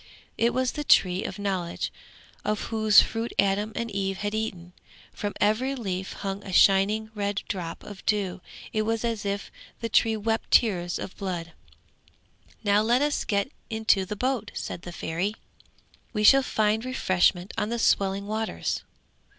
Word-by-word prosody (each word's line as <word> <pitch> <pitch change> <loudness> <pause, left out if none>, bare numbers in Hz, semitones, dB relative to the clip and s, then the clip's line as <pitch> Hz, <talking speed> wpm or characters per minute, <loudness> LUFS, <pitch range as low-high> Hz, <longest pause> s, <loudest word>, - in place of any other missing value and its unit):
It 235 +1 +2
was 255 0 0
the 300 - -4
Tree 185 -8 +4
of - - -5
Knowledge, 190 -4 -2 0.5
of 210 0 0
whose 215 -1 +7
fruit 225 +1 -3
Adam 200 +2 +2
and 235 -1 -3
Eve 195 -1 -2
had 205 +1 -3
eaten. 185 -5 -4 0.4
From 205 -1 -4
every 230 +6 +2
leaf 190 -6 -4
hung 195 0 -5
a 195 - -7
shining 205 +4 +4
red 205 -1 -2
drop 175 -4 -5
of 200 -2 -10
dew; 195 -3 0 0.3
it 215 - +1
was 225 +1 -1
as 225 -3 -2
if 200 0 -3 0.3
the 230 - -3
tree 225 0 +3
wept 225 +1 -1
tears 175 -7 +3
of - - -7
blood. 175 -4 -4 1.1
'Now 205 0 +4
let 240 +5 +3
us 295 -1 0
get 200 +5 0 0.2
into 220 -3 +2
the 205 +3 -5
boat,' 255 0 -1
said - - -5
the 175 - -8
Fairy. 175 +5 -2 0.8
'We 210 -1 0
shall 270 +5 +8
find 220 -3 +1
refreshment 185 -7 +1
on 210 - -1
the 235 - -1
swelling 195 -3 +2
waters. 220 +1 -2
210 Hz, 160 wpm, -26 LUFS, 195-225 Hz, 1.1 s, shall